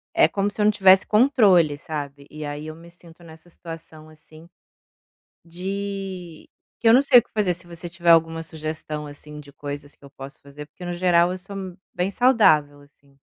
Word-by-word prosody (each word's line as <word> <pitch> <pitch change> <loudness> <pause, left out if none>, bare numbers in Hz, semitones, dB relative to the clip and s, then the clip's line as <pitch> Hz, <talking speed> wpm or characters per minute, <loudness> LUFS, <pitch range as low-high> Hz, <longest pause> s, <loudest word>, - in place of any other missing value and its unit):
é - - +5
como 200 0 -1
se 210 - -5
eu - - +3
não 210 - +5
tivesse 190 -2 +5
controle, 210 - +4
sabe. 145 -2 -7
E 155 0 -8
aí 145 +1 -6
eu 155 - -8
me 170 +1 -15
sinto 170 0 -18
nessa 160 +1 -16
situação, 165 -2 -12
assim, 155 +1 -17 1.0
de 190 -1 -6 0.3
que 230 - +3
eu - - +7
não 265 - +6
sei 275 -3 +6
o - - +4
que - - -33
fazer. 205 -4 +1
Se 170 0 -9
você 170 0 -9
tiver 170 0 0
alguma 165 0 +3
sugestão, 155 -1 -6
assim, 150 +1 -11
de 140 -1 -15
coisas 145 0 -8
que - - -24
eu 140 - -13
posso 135 0 -12
fazer, 145 +1 -11
porque 180 - -13
no 175 - -4
geral 175 0 +2
eu 185 - -6
sou 200 +2 -11 0.4
bem 180 +2 -1
saudável, 160 - +3
assim. 140 -1 -26
165 Hz, 200 wpm, -23 LUFS, 150-185 Hz, 1.0 s, eu